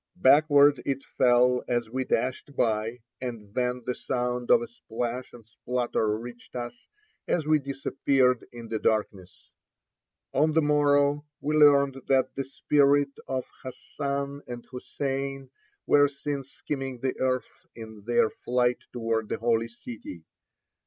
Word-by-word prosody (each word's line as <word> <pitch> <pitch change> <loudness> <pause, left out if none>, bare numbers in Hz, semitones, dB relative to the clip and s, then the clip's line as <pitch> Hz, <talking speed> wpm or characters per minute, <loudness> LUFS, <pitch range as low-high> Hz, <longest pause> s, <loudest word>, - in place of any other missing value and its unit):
Backward 145 -2 +5
it 135 -1 -2
fell 125 0 +3
as 120 -2 0
we 130 +1 -2
dashed 130 +4 -2
by, 115 +1 0 0.2
and 115 -5 -6
then 125 0 -1
the 125 - -1
sound 125 -1 -2
of 235 - +6
a - - -6
splash 125 - -5
and 115 -3 -14
splutter 115 -2 -1
reached 120 +2 -11
us 120 -1 -4 0.5
as 160 -4 0
we 155 0 +4
disappeared 135 -2 +1
in 120 -1 -9
the 110 - -2
darkness. 105 -5 -2 0.8
On 155 +3 +3
the 160 - +4
morrow 145 0 +3
we 150 +1 -1
learned 140 -3 +5
that 135 -1 +2
the 135 - -3
spirits 140 +1 +2
of 130 -1 -2 0.2
Hassan 140 +1 -4
and 120 -1 -7
Hussein 135 +1 -4 0.3
were 145 0 +5
seen 140 0 -4
skimming 135 -2 -5
the 130 -1 -2
earth 130 -1 -2
in 110 -2 -10
their 120 -2 +3
flight 125 0 0
toward 115 -2 -2
the - - -1
Holy 115 0 +1
City. 115 -7 -10
130 Hz, 140 wpm, -27 LUFS, 120-140 Hz, 0.8 s, of